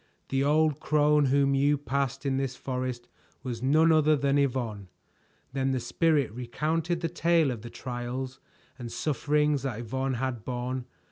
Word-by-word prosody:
The 135 0 +1
old 155 0 +2
crone 150 -1 +3
whom 140 +1 +3
you 145 +2 +3
passed 140 0 -2
in 135 -1 +1
this 135 -2 -2
forest 125 -2 -4 0.4
was 120 -3 -4
none 155 +5 +4
other 155 -1 +4
than 140 0 +2
Yvonne." 120 -8 -1 0.7
Then 135 0 0
the 130 - 0
Spirit 150 -1 +1
recounted 155 +8 -2
the 165 - 0
tale 165 -3 +2
of 115 -4 -5
the 120 - -8
trials 125 +2 -5 0.4
and 120 -2 -6
sufferings 150 -1 +1
that 125 -4 -3
Yvonne 130 +3 -2
had 125 -3 -3
borne. 125 +1 -3
135 Hz, 155 wpm, -28 LUFS, 125-150 Hz, 0.7 s, none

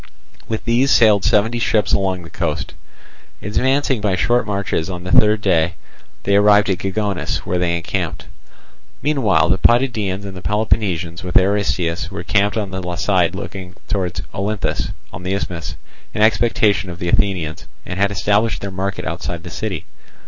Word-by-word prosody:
With 110 -1 -4
these 120 +4 +3
sailed 105 -6 +5
seventy 115 +5 +2
ships 110 -2 +1
along 95 -2 0
the 85 - -12
coast. - - -3 0.7
Advancing 130 +3 +1
by 100 -3 +1
short 120 +4 +1
marches, 100 -4 -1
on 90 -1 -5
the 90 - -5
third 105 +1 +5
day 85 -4 +2 0.5
they 100 - +2
arrived 105 0 +5
at 90 - -1
Gigonus, 95 0 -2
where 90 - -1
they 85 -1 +1
encamped. 85 - -3 0.8
Meanwhile 130 - +2
the 95 +2 +2
Potidæans 110 -6 +2
and 95 -1 -7
the 90 - -8
Peloponnesians 95 -5 -1
with 90 - +2
Aristeus 95 -3 +1
were 100 - -6
encamped 105 +2 +1
on 100 -3 -2
the 90 -2 -4
side 90 -1 +1
looking 95 -1 -7
towards 95 -4 -2
Olynthus 100 +1 -2 0.2
on 90 - -7
the 90 +2 -1
isthmus, 85 -3 -4 0.4
in 105 - +2
expectation 110 -3 +2
of 85 - -7
the 90 0 -3
Athenians, 95 -7 0 0.2
and 90 - -5
had 100 0 +3
established 105 +1 +1
their 100 - -4
market 95 +1 -3
outside 85 0 -4
the 85 - -8
city. 95 -4 -4
100 Hz, 165 wpm, -19 LUFS, 90-105 Hz, 0.8 s, sailed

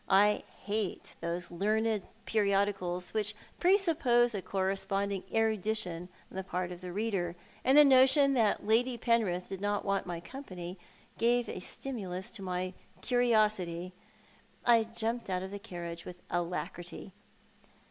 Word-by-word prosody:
I 205 +2 +5 0.2
hate 210 -2 -2
those 175 +1 -3
learned 215 +4 +1 0.2
periodicals 195 -4 +1
which 210 -1 -1 0.2
presuppose 320 - +4
a 200 - -2
corresponding 195 +1 -1
erudition 215 -5 0 0.2
on - - -8
the 190 - -2
part 180 -1 -3
of 175 0 -8
the 180 -1 -6
reader: 190 -4 -1 0.3
and 265 +3 +5
the 295 - +10
notion 275 +1 +6
that 220 -5 +2
Lady 240 +3 +3
Penrith 215 -7 +1
did 195 -1 -5
not 205 0 0
want 195 -1 0
my 175 -1 -3
company 180 -5 -8 0.4
gave 240 0 +3
a - - -5
stimulus 190 -3 -5
to 220 - -10
my 185 0 -2 0.3
curiosity. 215 -8 +2 0.7
I 230 -2 +5
jumped 230 0 -3
out 185 0 -1
of 190 - -6
the 205 - -5
carriage 170 -3 -6
with 180 0 -10
alacrity. 175 +2 -4
200 Hz, 135 wpm, -31 LUFS, 180-230 Hz, 0.7 s, the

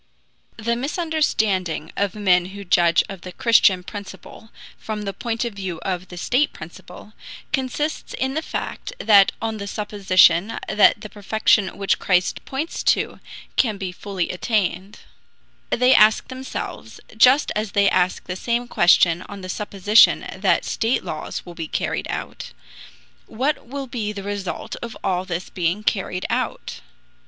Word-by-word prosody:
The 235 +1 -1
misunderstanding 240 - -1
of 200 -1 -1
men 185 -4 +3
who 200 - -7
judge 175 -2 +3
of 195 -3 -9
the 185 - -8
Christian 210 -6 +4
principle 205 +3 -10 0.3
from 215 -1 -5
the 200 -1 -4
point 235 +1 -3
of 235 - -4
view 190 -4 -5
of 185 -1 -3
the 180 - -11
state 255 +10 +1
principle, 175 +5 -12 0.4
consists 295 +3 -2
in 265 +1 -2
the 315 - -1
fact 410 - -5
that 200 -3 +5
on 225 -1 -2
the 200 -1 -6
supposition 200 -2 +3
that 210 - +4
the - - -7
perfection 205 -1 +1
which 195 -1 0
Christ 180 -1 +1
points 285 +5 -4
to, - - +1 0.4
can 220 -5 +2
be 190 -2 -4
fully 185 -1 -4
attained, 195 0 -2 0.7
they 250 +2 +4
ask 215 +3 +5
themselves 260 0 -7 0.2
(just 255 +6 +5
as 210 -1 -2
they 200 0 +4
ask 180 -1 +1
the 180 - -5
same 235 +5 -1
question 175 -5 +4
on 200 -1 -8
the 185 - -8
supposition 205 +2 +3
that - - +1
state 230 +3 0
laws 155 - -5
will 175 - -9
be 165 -2 -6
carried - - -2
out) - - -6 0.7
what 260 +4 -2
will 275 +2 -5
be 230 -4 -4
the 200 -2 -7
result 200 -2 -5
of 235 -1 -7
all 185 -1 0
this 180 -1 -5
being 180 +4 -1
carried 190 -4 -1
out? - - -3
205 Hz, 150 wpm, -22 LUFS, 185-235 Hz, 0.7 s, that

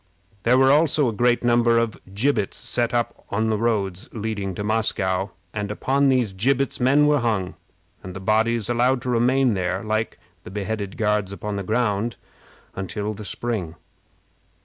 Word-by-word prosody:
There 120 +5 +4
were 135 0 +5
also 150 -1 +4
a - - -3
great 120 +3 +2
number 120 -1 +3
of 115 -2 0 0.2
gibbets 110 -2 0
set 120 -1 -1
up 120 -1 -2
on 110 +2 0
all 110 - +1
the 110 - +1
roads 105 -3 -1
leading 105 -4 -4
to 105 - -4
Moscow, 100 -3 0 0.2
and 105 -1 -3
upon 135 +6 +1
these 125 -6 +1
gibbets 135 +7 0
men 135 +4 +4
were 150 -1 +3
hung, 105 -7 -1 0.5
and 90 0 -9
the - - -5
bodies 110 +3 +1
allowed 120 +1 +1
to 125 - -1
remain 125 +1 +3
there, 95 0 -2
like 110 +1 -2 0.3
the - - -9
beheaded 100 0 -4
Guards 105 -3 0
upon 100 +2 -5
the 100 - -2
ground, 110 +2 0 0.6
until 100 +3 -4
the 105 +1 -8
spring. 100 -6 -4
110 Hz, 170 wpm, -23 LUFS, 100-120 Hz, 0.6 s, were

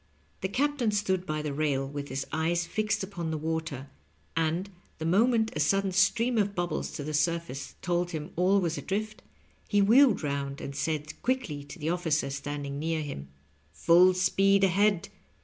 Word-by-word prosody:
The 190 - -1
captain 280 +1 +1
stood 190 -3 0
by 155 -1 -2
the 150 -2 -3
rail 140 -2 0
with 140 0 -6
his 135 0 -3
eyes 165 +2 0
fixed 215 +4 -1
upon 180 -4 -4
the 160 - -2
water, 155 -4 -4 0.4
and, 165 +4 0 0.3
the 160 - -5
moment 225 +5 +3
a - - -2
sudden 195 +6 +2
stream 220 +6 +2
of 205 -1 0
bubbles 175 0 -2
to 145 - -5
the 155 +2 -4
surface 150 -2 -1
told 175 0 0
him 155 -3 -5
all 185 +3 +3
was 170 -3 -1
adrift, 215 +4 -3 0.5
he 205 - +2
wheeled 225 - +5
round 140 -1 -3
and 140 - -6
said 155 +1 -3
quickly 240 - -1
to 145 - -10
the 160 0 -2
officer 160 -5 0
standing 140 0 -4
near 160 0 -1
him: 70 - -6 0.5
"Full 175 - +5
speed 195 +2 +3
ahead. 195 -1 +2
170 Hz, 170 wpm, -28 LUFS, 150-195 Hz, 0.5 s, wheeled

